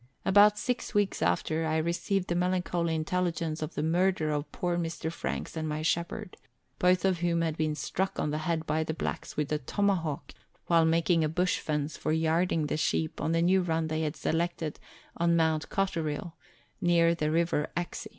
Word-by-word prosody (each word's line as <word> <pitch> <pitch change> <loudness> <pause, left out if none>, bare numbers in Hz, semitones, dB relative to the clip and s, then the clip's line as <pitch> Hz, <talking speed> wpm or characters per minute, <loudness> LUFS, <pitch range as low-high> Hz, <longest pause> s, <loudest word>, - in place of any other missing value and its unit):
About 205 +2 +6
six 245 0 -3
weeks 205 -1 +1
after, 155 - +1
I 160 0 +1
received 175 +4 0
the - - +1
melancholy 175 -2 0
intelligence 165 -1 -1
of 155 - -4
the 150 - -1
murder 170 -1 +2
of 145 0 -3
poor 175 -1 -1
Mr. 165 -1 -3
Franks 170 - -4
and 155 -1 -2
my 155 +1 -3
shepherd, 170 +5 -2 0.4
both 180 0 +3
of 185 -3 +2
whom 170 -1 +1
had 160 -2 0
been 155 -1 0
struck 190 +5 -2
on 150 - 0
the 150 - -1
head 160 0 -1
by 155 +1 0
the 160 0 -3
blacks - - -4
with 150 0 -1
a 150 - +1
tomahawk 165 -1 -1 0.3
while 165 -1 +4
making 165 0 +3
a 155 - +1
bush 180 +3 +1
fence 150 0 -2
for - - -2
yarding 160 0 +1
the 150 - -1
sheep 155 0 -1
on 160 - 0
the 165 0 +2
new 185 +2 +4
run 165 -2 -1
they 155 0 -1
had 155 0 -2
selected 165 -2 -2 0.4
on 170 0 +3
Mount 160 -1 +1
Cotterill, 170 -3 -2 0.5
near 170 -2 +4
the 155 -2 -1
River 165 -2 +1
Exe. 175 0 -4
165 Hz, 190 wpm, -29 LUFS, 155-175 Hz, 0.5 s, About